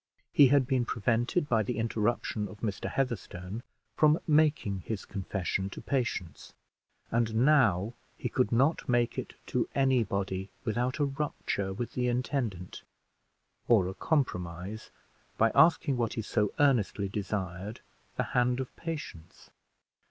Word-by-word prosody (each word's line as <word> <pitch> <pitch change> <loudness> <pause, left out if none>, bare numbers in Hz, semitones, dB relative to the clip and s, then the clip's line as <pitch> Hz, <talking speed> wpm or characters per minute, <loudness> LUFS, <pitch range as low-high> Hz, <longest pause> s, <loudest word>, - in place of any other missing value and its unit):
He 140 - +8
had 135 0 +4
been 130 -1 +1
prevented, 120 - 0
by 115 -4 +3
the 110 +2 -2
interruption 110 -1 -1
of 105 +2 -12
Mr. 105 -3 -2
Heatherstone, 105 -5 -3 0.3
from 155 +1 +4
making 150 - +2
his 105 +3 -5
confession 95 -1 -2
to - - -8
Patience; 115 - -3 0.6
and 115 -1 +1
now 115 -8 +4 0.2
he - - -3
could 105 - +1
not 135 +5 +2
make 120 -1 +2
it - - -7
to - - -1
any 130 -3 +3
body 95 -1 -3
without 120 +2 -1
a 145 - +2
rupture 135 -8 -2
with 115 +5 -4
the 125 -1 0
intendant, 120 - -2 0.9
or 105 -7 +5
a 95 - -4
compromise, 95 - -2 0.5
by 115 0 +4
asking 160 -5 +4
what 115 -2 0
he 115 - -3
so 105 -1 0
earnestly 115 -8 +2
desired 95 0 -4 0.4
the - - +2
hand 125 0 +2
of 130 - -5
Patience. 150 - -7
115 Hz, 135 wpm, -30 LUFS, 100-130 Hz, 0.9 s, He